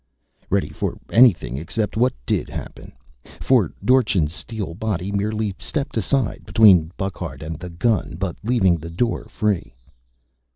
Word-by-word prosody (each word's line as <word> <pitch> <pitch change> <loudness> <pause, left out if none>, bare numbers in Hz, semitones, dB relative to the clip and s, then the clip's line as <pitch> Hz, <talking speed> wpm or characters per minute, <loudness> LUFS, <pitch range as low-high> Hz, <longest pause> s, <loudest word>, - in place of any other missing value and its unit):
Ready - - +1
for - - -3
anything 95 - +4
except 100 +8 -2
what 125 +3 +2
did - - -1
happen. - - -8 0.5
For - - +3
Dorchin's 105 - +3
steel 100 -4 -5
body 100 -1 -3
merely 105 +1 -1
stepped 145 -2 -3
aside, 120 +3 0
between 95 -8 +5
Burckhardt 95 -4 -5
and 80 0 -6
the 90 +1 -7
gun, 100 +6 0
but 95 -2 -2
leaving 105 -7 +3
the 80 +1 -8
door 115 +8 -1
free. 105 - -2
100 Hz, 135 wpm, -22 LUFS, 85-115 Hz, 0.5 s, between